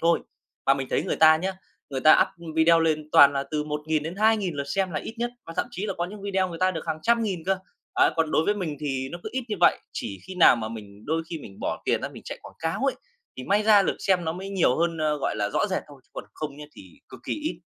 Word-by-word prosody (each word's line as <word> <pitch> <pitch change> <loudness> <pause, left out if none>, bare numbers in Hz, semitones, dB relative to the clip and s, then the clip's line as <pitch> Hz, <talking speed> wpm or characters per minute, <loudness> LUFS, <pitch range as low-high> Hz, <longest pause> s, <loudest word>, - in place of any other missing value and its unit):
thôi. 170 0 +3 0.5
Và 135 - +6
mình 135 -1 -4
thấy - - +1
người - - -2
ta 155 0 +7
nhá, 190 +4 -2 0.4
người 135 - -3
ta 155 +3 +7
up 165 -2 -8
video 165 +1 +5
lên 155 -2 0
toàn 140 0 +8
là 140 -1 -1
từ 150 -1 -1
1.000-2.000 160 +6 0
lượt 140 0 -3
xem 190 +5 -1
là - - -2
ít 225 - -7
nhất, 240 0 -1 0.2
và 165 - -7
thậm - - 0
chí 210 -3 -4
là 195 - -3
có 175 -1 -2
những 200 +2 -9
video 190 -2 0
người 165 -1 -7
ta 185 0 +3
được 165 -3 -6
hàng 155 - -2
trăm 235 0 +3
nghìn 185 -7 -3
cơ. 190 0 +1 0.4
À, - - +5
còn 160 -1 +1
đối 160 - +2
với 205 - +2
mình 165 -7 -4
thì 135 -2 -2
nó 175 - -7
cứ - - -5
ít 260 -1 -2
như 210 - -2
vậy, - - +5
chỉ 100 -3 -5
khi 190 - -7
nào 170 -8 +7
mà 110 -1 -4
mình 105 -2 -10
đôi 160 +2 -1
khi 165 - -4
mình 100 -9 -12
bỏ - - -3
tiền - - +1
ra - - -2
mình - - -12
chạy - - -6
quảng - - -12
cáo 160 +6 -2
ấy, 275 - +2 0.4
thì 130 - -6
may 205 +6 +2
ra 210 -2 +6
lượt - - -1
xem 180 -3 +1
nó 160 - -1
mới 190 +3 -7
nhiều 180 -10 +2
hơn, 170 -1 0
ơ, 155 -1 +1
gọi 135 - -2
là, 105 -1 0
rõ - - +1
rệt 190 -2 -2
thôi, 140 -2 -14
chứ - - -36
còn - - -7
không 150 -2 -5
nhá 150 - -9
thì 95 -3 -15
cực 130 - -12
kỳ - - -2
ít. 310 +1 -4
165 Hz, 285 wpm, -25 LUFS, 150-190 Hz, 0.5 s, toàn